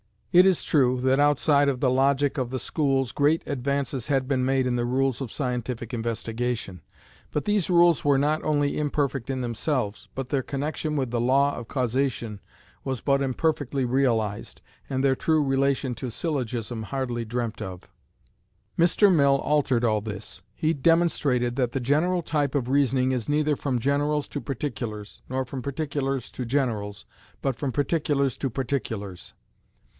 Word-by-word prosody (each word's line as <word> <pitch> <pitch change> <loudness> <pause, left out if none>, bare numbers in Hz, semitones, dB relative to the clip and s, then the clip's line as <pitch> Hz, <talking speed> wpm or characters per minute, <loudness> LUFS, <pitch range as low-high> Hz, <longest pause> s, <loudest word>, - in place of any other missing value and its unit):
It 180 +1 +7
is 185 -3 +2
true, 130 -4 +2
that 130 +1 +3
outside 145 0 +4
of 130 -3 -2
the 130 - +3
logic 140 +2 +2
of 125 -2 -1
the 130 - -3
schools 135 -1 0
great 150 +4 +2
advances 140 -2 -2
had 135 -3 +1
been 130 -2 +1
made 135 0 +2
in 125 -1 0
the 120 - 0
rules 130 0 0
of 135 -5 -5
scientific 125 -3 -3
investigation; 115 -4 -3 0.5
but 150 - -1
these 205 -4 +1
rules 175 -2 +5
were 145 -2 +4
not 150 +3 +1
only 145 -2 +1
imperfect 140 -3 -1
in 130 -1 -2
themselves, 120 -2 -2
but 135 -1 -4
their 140 -2 +1
connection 150 +3 -3
with 130 -5 -1
the 120 - 0
law 140 +3 +3
of 120 - -7
causation 125 -4 -1 0.5
was 130 -2 -2
but 140 -1 +2
imperfectly 140 -1 0
realized, 115 -5 0 0.3
and 130 0 -1
their 135 -1 +3
true 155 +1 +2
relation 135 -1 +1
to 130 - -5
syllogism 120 -5 -3
hardly 120 0 -3
dreamt 115 0 -3
of. 90 -2 -7 0.9
Mr. 185 +4 +5
Mill 140 -4 +4
altered 135 -5 +1
all 110 -3 +2
this. 105 -1 -7
He 155 +1 +1
demonstrated 140 -6 +2
that 125 -3 0
the 135 - -1
general 160 +8 +2
type 145 -3 -1
of 125 -3 0
reasoning 130 -2 +2
is 125 -2 -2
neither 150 0 +2
from 130 -3 -1
generals 145 +3 0
to 145 - -4
particulars, 115 -6 -5
nor 130 +1 -1
from 130 +1 -6
particulars 140 -2 -3
to 125 - -5
generals, 115 -6 -2 0.4
but 135 -4 -1
from 140 0 -2
particulars 145 -2 0
to 135 - -2
particulars. 115 -7 -4
135 Hz, 160 wpm, -25 LUFS, 120-145 Hz, 0.9 s, It